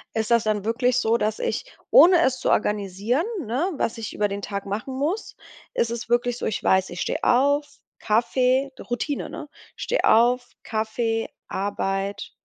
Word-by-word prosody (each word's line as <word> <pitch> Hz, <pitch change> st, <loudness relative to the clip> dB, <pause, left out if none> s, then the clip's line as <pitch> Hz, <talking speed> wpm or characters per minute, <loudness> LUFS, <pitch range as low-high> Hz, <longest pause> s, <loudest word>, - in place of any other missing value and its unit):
ist 220 Hz, +1 st, -1 dB
das 235 Hz, -2 st, +4 dB
dann 210 Hz, -2 st, 0 dB
wirklich 245 Hz, +2 st, +1 dB
so, 225 Hz, +1 st, +2 dB
dass 215 Hz, 0 st, -1 dB
ich, -, -, -2 dB, 0.3 s
ohne 355 Hz, -7 st, +8 dB
es 255 Hz, -3 st, +1 dB
zu -, -, -1 dB
organisieren, 210 Hz, -, 0 dB, 0.2 s
ne, 265 Hz, -, -1 dB
was 230 Hz, -, -2 dB
ich 220 Hz, -2 st, -6 dB
über 205 Hz, -1 st, 0 dB
den 200 Hz, 0 st, -4 dB
Tag 200 Hz, -1 st, -5 dB
machen 220 Hz, +7 st, -4 dB
muss, 340 Hz, +10 st, -2 dB, 0.4 s
ist 230 Hz, -, 0 dB
es 235 Hz, -1 st, -5 dB
wirklich 240 Hz, 0 st, +1 dB
so, -, -, -4 dB
ich 215 Hz, -, -2 dB
weiß, 190 Hz, 0 st, +3 dB
ich 175 Hz, -, -6 dB
steh -, -, -1 dB
auf, 285 Hz, +3 st, +2 dB, 0.2 s
Kaffee 255 Hz, +5 st, +1 dB, 0.2 s
Routine, 275 Hz, +4 st, -2 dB
ne? 295 Hz, -, -8 dB, 0.3 s
Steh -, -, -1 dB
auf, 245 Hz, +2 st, +4 dB, 0.2 s
Kaffee, 225 Hz, +1 st, -2 dB, 0.2 s
Arbeit 195 Hz, 0 st, -2 dB
230 Hz, 170 wpm, -24 LUFS, 210-260 Hz, 0.4 s, ohne